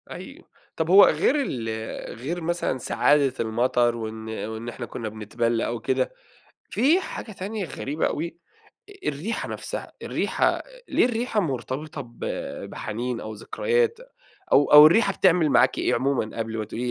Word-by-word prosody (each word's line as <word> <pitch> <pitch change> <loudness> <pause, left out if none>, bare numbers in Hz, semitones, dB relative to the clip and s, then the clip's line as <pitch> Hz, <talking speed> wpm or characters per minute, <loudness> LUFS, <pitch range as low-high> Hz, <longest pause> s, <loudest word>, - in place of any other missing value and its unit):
حقيقي، - - -9 0.3
طب 160 0 -1
هو 195 +3 +9
غير 160 - +2
ال 120 - -3 0.5
غير 165 +8 -4
مثلًا 170 -4 -1
سعادة 140 +2 +2
المطر 120 +1 +1
وإن 110 -1 -6 0.2
وإن 110 +2 -5
إحنا 120 +1 -6
كنا 115 -1 -5
بنتبل 115 +2 -1
أو 120 0 -2
كده، 130 - 0 0.6
في 295 - +3
حاجة 225 - -7
تانية 200 +1 -4
غريبة 150 0 -2
أوي، 165 +2 -4 0.5
أ - - -12
الريحة 155 +11 -3
نفسها، - - -5
الريحة، - - 0 0.2
ليه - - +3
الريحة 240 -2 0
مرتبطة 140 - -3
ب 120 -3 -15 0.5
بحنين 120 +3 -4
أو 110 - -6
ذكريات، 470 - 0 0.5
أو 145 - +5
أو 150 0 +11
الريحة 195 +4 +3
بتعمل 180 -5 +3
معاكِ - - +4
إيه - - +1
عمومًا، 130 -4 -1
قبل 115 0 -3
ما 110 - -2
تقولي 120 +4 -5
140 Hz, 150 wpm, -25 LUFS, 115-180 Hz, 0.6 s, أو